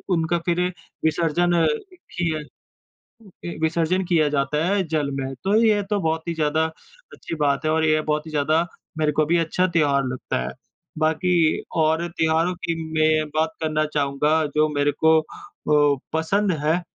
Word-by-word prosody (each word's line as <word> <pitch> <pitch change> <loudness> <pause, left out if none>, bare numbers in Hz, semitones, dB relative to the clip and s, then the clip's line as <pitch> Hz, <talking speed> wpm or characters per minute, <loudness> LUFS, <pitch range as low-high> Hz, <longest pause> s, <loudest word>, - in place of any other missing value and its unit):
उनका 165 +1 0
फिर 175 0 +1 0.4
विसर्जन 170 +2 +1 0.4
किया 170 - -3 1.2
विसर्जन 170 +3 +1
किया 165 -4 +2
जाता 150 +3 0
है 200 0 +2
जल 145 -3 0
में। 135 0 -4
तो 200 +2 +2
ये 210 -2 +3
तो 205 -1 +1
बहुत 160 0 -2
ही 170 - -1
ज़्यादा 155 0 +1 0.5
अच्छी - - -7
बात 140 +2 +1
है 155 - +2
और 160 0 +2
ये 155 0 +3
बहुत 150 +1 -2
ही - - -7
ज़्यादा 155 +3 +1 0.3
मेरे 150 -1 +1
को 155 - +5
भी 170 +2 +2
अच्छा 170 +3 +1
त्योहार 145 -5 +2
लगता 125 - -3
है। 65 - -5 0.5
बाकी 160 +3 +1 0.5
और 160 +2 +2
त्योहारों 165 +2 +1
की 165 - 0 0.2
मैं 155 -1 +2
बात 160 +1 +2
करना 155 -1 0
चाहूँगा 140 +1 +1 0.3
जो 155 0 +4
मेरे 145 -1 +1
को 160 0 +6
अ, - - -11 0.9
पसंद 185 +5 +1
है। 160 +3 +3
अ, - - -8
160 Hz, 165 wpm, -23 LUFS, 150-170 Hz, 1.2 s, को